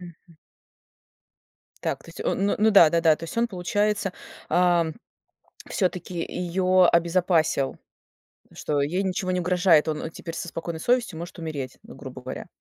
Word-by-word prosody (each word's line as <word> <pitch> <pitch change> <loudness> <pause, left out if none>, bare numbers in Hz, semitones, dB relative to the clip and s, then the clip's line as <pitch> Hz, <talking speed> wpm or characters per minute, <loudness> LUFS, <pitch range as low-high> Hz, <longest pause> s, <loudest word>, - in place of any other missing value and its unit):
Мгм. 170 -1 -14 1.5
Так, - - -2
то - - -18
есть - - -10
он 195 - 0
ну - - +2
ну 220 +1 +4
да, 170 -6 +7
да-да. 165 -2 +4
То 165 - -8
есть 165 - -8
он, 235 +1 +2
получается, 205 +1 -1 0.4
а, 175 -1 +3 0.8
всё-таки 180 -2 -2
её 180 +1 +2
обезопасил. 170 -5 +2 0.8
Что 145 -1 -1
ей 175 +7 0
ничего 185 0 -1
не 180 - 0
угрожает, 180 -3 +3
он 155 +1 -3
теперь 165 -1 -8
со 170 - -5
спокойной 165 -1 -5
совестью 240 -8 +1
может 170 +1 -8
умереть, 145 -6 -5
ну, - - -13
грубо - - -9
говоря. - - -7
175 Hz, 150 wpm, -25 LUFS, 165-185 Hz, 1.5 s, да